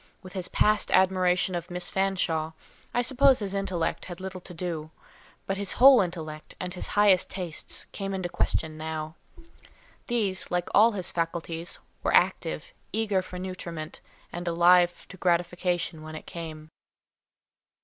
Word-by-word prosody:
With 185 -1 -10
his 185 -2 -3
past 210 0 +2
admiration 185 -1 +3
of 175 +1 -4
Miss 180 0 -2
Fanshawe, 180 -5 0 0.4
I 245 - +1
suppose 265 +1 +5
his 200 -2 -2
intellect 190 -4 -1
had 175 -2 -8
little 190 -1 -6
to 180 - -11
do, 165 -3 -4 0.6
but 195 - -2
his 200 -1 0
whole 265 +1 +8
intellect, 160 -4 -5
and 180 -1 -4
his 180 - -3
highest 200 -3 +5
tastes, 180 -4 -4
came 195 -1 -3
in 190 - -3
question 160 -2 -1
now. 155 0 -4 0.9
These, 210 -6 0
like 175 0 -1
all 225 +2 +6
his 185 -3 -1
faculties, 165 0 -3 0.2
were - - +2
active, - - +1 0.2
eager 210 -4 +1
for 185 0 -9
nutriment, 175 -4 -6 0.3
and 175 0 -5
alive 175 +1 +4
to 190 - -10
gratification 175 -2 0
when 155 0 -8
it 155 - -8
came. 155 -2 -8
180 Hz, 150 wpm, -27 LUFS, 170-195 Hz, 0.9 s, whole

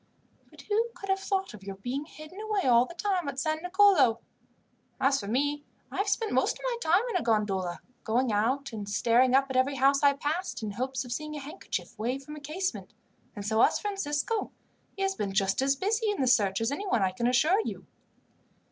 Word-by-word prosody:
But - - -14
who 440 +3 +1
could 390 - -9
have 385 0 +2
thought 385 - -2
of 210 - -11
your 195 0 -7
being 250 +9 -4
hidden 310 +5 -11
away 425 -2 -1
all 245 -1 +5
the 345 - -11
time 370 -3 -1
at 280 -1 -4
San 310 +2 -1
Nicolo! 360 - +4 0.8
As 275 +1 +3
for 200 - -6
me, 285 +6 0 0.3
I - - -6
have 400 - 0
spent 430 +1 0
most - - +2
of - - -16
my - - -1
time 360 +4 +3
in 370 - +1
a - - -1
gondola, 195 -6 0 0.2
going 245 +2 +1
out 245 +6 0
and 205 -2 -5
staring 245 +4 +3
up 270 0 +5
at - - -4
every 260 +2 +2
house 275 +1 +3
I 285 -1 +5
passed, 295 0 -3
in 210 - -3
hopes 255 +4 -3
of 245 - -9
seeing 305 +4 -4
a - - -4
handkerchief 280 -5 -6
waved 255 +5 -2
from 300 - -8
a - - -8
casement. 285 - -4 0.4
And 205 -2 -6
so 220 +2 +2
has - - +4
Francisco; 395 0 -2 0.5
he 390 - -2
has 390 0 +1
been 200 - -3
just 195 +3 +1
as 275 +1 +2
busy 430 - 0
in 410 - -1
the 265 - +2
search 205 -6 +3
as 225 +3 0
anyone, 285 - 0
I 190 - +2
can 235 +6 -1
assure 305 - +3
you." - - -6
275 Hz, 220 wpm, -28 LUFS, 230-370 Hz, 0.8 s, all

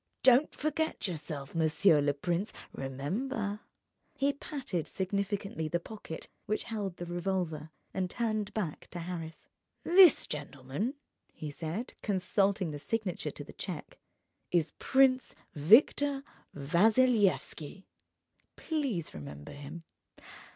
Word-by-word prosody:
"Don't 260 +3 +6
forget 310 -4 -1
yourself, 150 -5 -5
monsieur 160 0 +4
le 145 0 +1
prince. 175 +7 -1 0.2
Remember 200 - -3 0.3
..." - - -45
He 280 +1 +2
patted 270 - -4
significantly 195 -3 -2
the 175 +3 0
pocket 170 -4 -8 0.2
which 215 +1 0
held 205 -6 -4
the 175 - -5
revolver, 175 -3 -2 0.2
and 185 -1 -1
turned 215 -2 -1
back 180 -9 -3
to 175 - -8
Harris. 165 -2 -6 0.4
"This 360 -3 +7
gentleman," 145 - -3 0.4
he 150 -2 -6
said, 165 - -4
consulting 195 -2 +1
the 145 - -5
signature 205 +2 -2
to - - -7
the - - -12
cheque, - - -6 0.5
"is 165 -3 +1
Prince 265 -1 +3 0.2
Victor 270 - +5 0.3
Vassilyevski. 195 - +2 0.7
Please 270 - -2
remember 70 0 -8
him. 145 +4 -8
185 Hz, 115 wpm, -31 LUFS, 155-225 Hz, 0.7 s, This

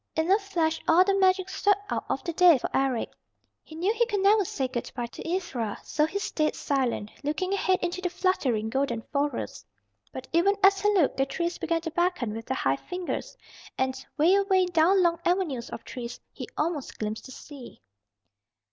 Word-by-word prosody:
In 320 +3 +1
a 400 - +5
flash 335 -6 -1
all 335 +3 +6
the 395 +1 +1
magic 375 0 +3
swept 405 0 +1
out - - -2
of - - -2
the 340 - -3
day 350 -3 +6
for - - -4
Eric. 265 -3 0 0.5
He 315 - -13
knew 365 +7 +1
he 475 0 +1
could 410 -4 -1
never 410 +1 +5
say 270 -7 -2
good 250 -2 -5
by 240 -2 -2
to 235 - -10
Ivra, 255 - -2
so 300 0 +1
he 390 - -4
stayed 310 -7 -1
silent, 255 -6 -1
looking 365 +7 -1
ahead 375 -2 +2
into 350 +1 -2
the 360 - -1
fluttering, 280 - 0
golden 240 -3 -1
forest. 285 +1 -2 0.5
But - - -8
even 375 +5 +4
as 390 0 +6
he 415 +1 +3
looked 335 -8 +2
the 270 0 +1
trees 340 +3 -3
began 330 0 0
to 325 -1 -5
beckon 345 -10 0
with 225 +1 -7
their 260 - -1
high 135 +1 +1
fingers, 360 - -5 0.4
and 260 0 -1
'way 320 +5 +5
away, 390 -2 +3
down 355 +2 +3
long 340 -1 +2
avenues 340 -10 0
of - - -7
trees 240 -1 -7
he - - -7
almost 305 -3 -2
glimpsed 215 0 -4
the - - -11
sea. 265 - -12
330 Hz, 195 wpm, -27 LUFS, 265-375 Hz, 0.5 s, all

